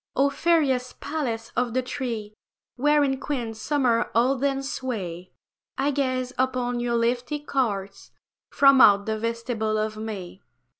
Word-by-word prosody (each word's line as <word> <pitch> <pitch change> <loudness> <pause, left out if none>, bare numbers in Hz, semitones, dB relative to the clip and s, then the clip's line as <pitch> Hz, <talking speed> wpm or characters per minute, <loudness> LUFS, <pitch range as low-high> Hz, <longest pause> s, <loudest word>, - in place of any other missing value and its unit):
O 280 +1 +3
fairest 280 -7 +1
palace 240 -7 -3
of 245 -1 0
the 255 - +1
three, 235 -5 -4 0.4
Wherein 285 0 +2
Queen 250 -6 -3
Summer 240 0 +1
holdeth 270 +3 +1
sway, 185 -11 -5 0.5
I 275 +2 +1
gaze 255 -2 -1
upon 250 -1 0
your 240 0 0
leafy 240 +5 0
courts 230 -9 -3 0.4
From 275 -1 +6
out 200 0 +6
the 220 0 -2
vestibule 230 -1 -2
of 215 0 -2
May. 205 -4 -6
245 Hz, 130 wpm, -25 LUFS, 220-270 Hz, 0.5 s, From